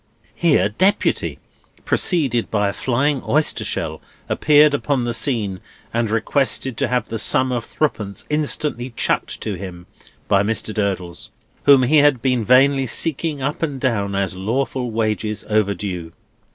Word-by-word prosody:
'" - - -35
Here, 150 - +3
Deputy 190 - +1 0.5
(preceded 135 -10 +1
by 105 -2 +1
a - - -4
flying 130 +2 0
oyster 155 +1 +1
shell) - - -3 0.3
appeared 150 0 +4
upon 140 -2 0
the 120 0 -2
scene, 110 -7 -1 0.3
and 115 -1 0
requested 130 +3 0
to - - 0
have 125 +1 -1
the 115 - -3
sum 130 +4 +2
of 120 -2 -2
threepence 105 -10 -3
instantly 145 -5 -1
"chucked" - - -1
to 105 - -3
him 90 -2 -8 0.4
by 100 - +3
Mr. 110 +1 -2
Durdles, 95 -5 -3 0.4
whom 140 -2 +7
he 145 +5 +3
had 145 -3 +4
been 125 -2 0
vainly 135 +3 +4
seeking 150 +2 -1
up 145 +2 -2
and 145 -5 -2
down, 100 -6 -1
as 95 -1 -1
lawful 125 +5 -2
wages 110 -1 -2
overdue. 100 -5 -1
120 Hz, 150 wpm, -20 LUFS, 105-140 Hz, 0.5 s, whom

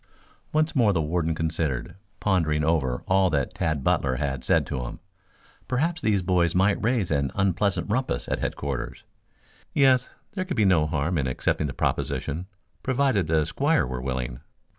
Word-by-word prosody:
Once 155 +1 +1
more 115 -6 +4
the 85 - +1
warden 80 +1 0
considered, 80 -5 -2 0.3
pondering 80 -7 +1
over 75 -6 0
all 95 0 +4
that 70 -5 -1
Tad 80 -5 -1
Butler 65 -1 +1
had 65 -2 -2
said - - +3
to 65 - -3
him. - - -7 0.7
Perhaps 160 +6 0
these 100 -6 +1
boys 85 -2 +2
might 100 +3 +2
raise 115 -6 +1
an 70 -2 +1
unpleasant 95 -1 +1
rumpus 115 - -1
at - - -1
headquarters. 70 -3 -4 0.7
Yes, 130 -3 +4 0.2
there 185 - -2
could 180 -7 -4
be 105 - +4
no 85 -5 +4
harm 80 +3 0
in 65 - 0
accepting 65 +3 0
the 65 - -5
proposition 85 +7 -2 0.3
provided 130 - +1
the 80 -1 +2
squire 145 - +1
were 65 0 -4
willing. 65 -2 -3
85 Hz, 160 wpm, -25 LUFS, 70-105 Hz, 0.7 s, more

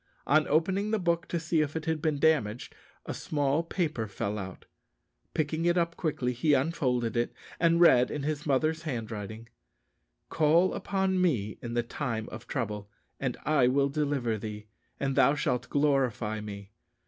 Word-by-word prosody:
On 155 +2 +3
opening 190 +7 +1
the 220 - +2
book 170 -3 0
to 170 - -1
see 160 0 +1
if 150 0 -2
it 160 0 -3
had 160 -2 -1
been 155 -2 +1
damaged, 135 -7 +1 0.3
a - - -4
small 145 0 0
paper 160 - -2
fell 100 +1 -3
out. 95 -2 -8 0.7
Picking 155 +1 0
it 175 +1 +3
up 170 -1 +1
quickly, 135 -7 -1
he 145 +5 +3
unfolded 130 -5 0
it, 120 0 +1 0.3
and 170 0 +4
read, 125 -8 +6
in 145 - -4
his 150 0 -2
mother's 155 +4 +1
handwriting: 110 -6 -5 0.8
"_Call 165 +4 +3
upon 190 -1 0
me 115 - 0
in 120 -1 -5
the 120 - +2
time 115 -3 -3
of 115 +2 -9
trouble; 105 -6 -3 0.3
and - - -2
I 145 -5 +4
will 140 +2 +2
deliver 140 -6 -1
thee, 105 0 -6 0.3
and 135 -1 -1
thou 140 - +5
shalt 125 -4 -1
glorify 130 -7 +1
me. 100 -1 -8
140 Hz, 165 wpm, -29 LUFS, 115-160 Hz, 0.8 s, read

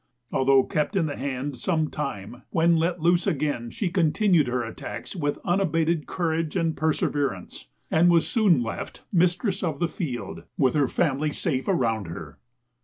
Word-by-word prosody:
Although 135 0 +4
kept 150 +10 -1
in 180 -4 +2
the 145 - -3
hand 135 0 -4
some 160 -2 0
time, 120 -4 -5
when 170 +1 +3
let 165 +1 0
loose 175 +1 +3
again 140 -6 -1
she 180 - -3
continued 175 - +3
her 125 0 -1
attacks 110 - -7
with 145 -5 -1
unabated 165 -4 +1
courage 165 -2 -1
and 165 -3 +1
perseverance, 145 - -1 0.2
and 170 +2 +5
was 170 -2 +4
soon 190 - +3
left 115 - -6
mistress 180 +3 +2
of 160 -6 -1
the 170 - +1
field, 145 -9 -5 0.2
with 130 -3 +3
her 145 -3 +3
family 150 -1 0
safe 140 -5 -2
around 115 - +1
her. 80 -3 -8
155 Hz, 160 wpm, -25 LUFS, 130-175 Hz, 0.2 s, and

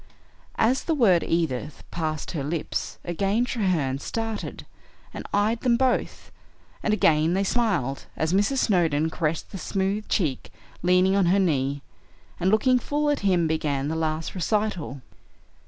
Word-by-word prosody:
As 250 +4 +2
the 325 - +1
word 195 - +4
"Edith" 155 -4 -2
passed 155 -2 -3
her 150 -5 -3
lips, 155 +3 -3
again 195 +7 0
Treherne 175 - 0
started 225 +5 -4 0.5
and - - -7
eyed 215 +3 +1
them 240 -2 +3
both, 260 0 -1 0.5
and 215 - 0
again 165 -4 +3
they 195 - +1
smiled, 190 - 0
as 160 +2 0
Mrs. 205 +8 +2
Snowdon 160 - +2
caressed 160 -1 -2
the 195 - -6
smooth 195 +3 -2
cheek 155 - -1 0.3
leaning 180 +2 +3
on 195 -3 +3
her 185 +3 +4
knee, 140 -6 0 0.6
and 180 +1 +2
looking 250 +5 +4
full 295 +4 0
at 290 - 0
him 185 -4 +2
began 150 -3 -1
the 160 - -2
last 160 0 -2
recital. 185 - -2
180 Hz, 145 wpm, -25 LUFS, 155-215 Hz, 0.6 s, word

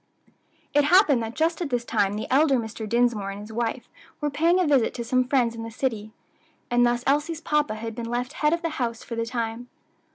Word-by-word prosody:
It 290 0 +4
happened 305 - +5
that 225 +1 -5
just 325 +2 0
at 330 - -2
this 245 -2 -1
time 200 -3 +1
the 215 - -3
elder 280 -1 +4
Mr. 220 -2 -5
Dinsmore 235 -4 +1
and 195 +1 -6
his 210 +1 -10
wife 235 +1 -2 0.3
were 295 -1 -1
paying 335 +5 +3
a 365 - +3
visit 275 -6 +2
to 235 - -3
some 255 +1 +1
friends 250 -4 +2
in 230 - -7
the 225 - -6
city, 225 -3 -3 0.6
and 245 0 +4
thus 240 0 +1
Elsie's 295 +3 +1
papa 300 -7 0
had 225 +1 -5
been 230 +1 -5
left 245 +3 -2
head 300 -1 +1
of 335 +1 -1
the 330 - 0
house 230 -2 -2
for - - -8
the 230 0 -2
time. 235 0 -4
245 Hz, 225 wpm, -25 LUFS, 230-290 Hz, 0.6 s, happened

